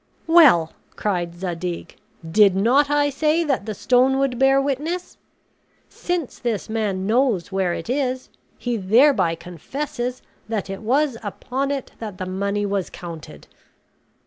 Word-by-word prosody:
"Well," 290 - +6 0.2
cried 175 -4 -2
Zadig, 175 -1 -5 0.3
"did 200 +2 +5
not 255 +9 +3
I 290 0 +2
say 310 +4 +1
that 275 -9 -1
the 215 - -3
stone 255 +5 +3
would 270 -3 0
bear 270 0 +5
witness? 295 +6 -3 0.7
Since 350 -6 -3
this 235 -4 -2
man 210 -4 -2
knows 220 -5 +1
where 190 -2 0
it - - -7
is, 255 0 -1 0.3
he 245 -1 -2
thereby 205 - +4
confesses 240 - -5 0.3
that 210 -4 -2
it 195 - -6
was 265 +3 +1
upon 255 +6 -3
it 280 -2 -3
that 210 -5 -6
the 185 - -4
money 200 +2 -1
was 195 -3 -2
counted." 170 -3 -9
230 Hz, 140 wpm, -22 LUFS, 190-275 Hz, 0.7 s, Well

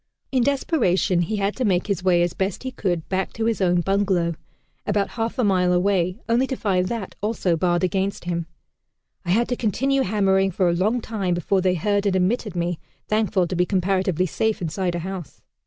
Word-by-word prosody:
In 260 -2 +2
desperation 235 - +1
he 175 +6 -1
had 200 0 -1
to 255 - -1
make 185 -5 +2
his 200 -4 -2
way 175 -2 +4
as 175 - -1
best 190 +3 -2
he 260 - -4
could 180 -9 -2
back 190 0 -2
to 225 - -2
his 225 -3 0
own 175 -1 +3
bungalow, 190 -3 +1 0.5
about 205 -1 +1
half 225 +2 -3
a 250 - +1
mile 185 -3 +3
away, 180 0 +1
only 240 +3 +2
to 265 - -2
find 185 -6 0
that 225 -3 -4
also 205 -5 0
barred 175 +1 +1
against 190 +2 -1
him. 170 -1 -2 0.8
"I - - -5
had 230 +6 +3
to 245 - 0
continue 270 +5 +1
hammering 195 -3 +2
for 185 0 +1
a 170 - +2
long 215 +7 +1
time 200 -6 -2
before 185 +2 +1
they 185 0 +2
heard 205 +4 0
and 190 - +1
admitted 190 +2 0
me, 175 -1 -1 0.3
thankful 215 -3 +2
to 180 - -4
be 180 +1 +1
comparatively 185 -2 +1
safe 220 +5 -1
inside 175 +1 -2
a - - -2
house." 185 -3 -7
190 Hz, 205 wpm, -23 LUFS, 180-215 Hz, 0.8 s, way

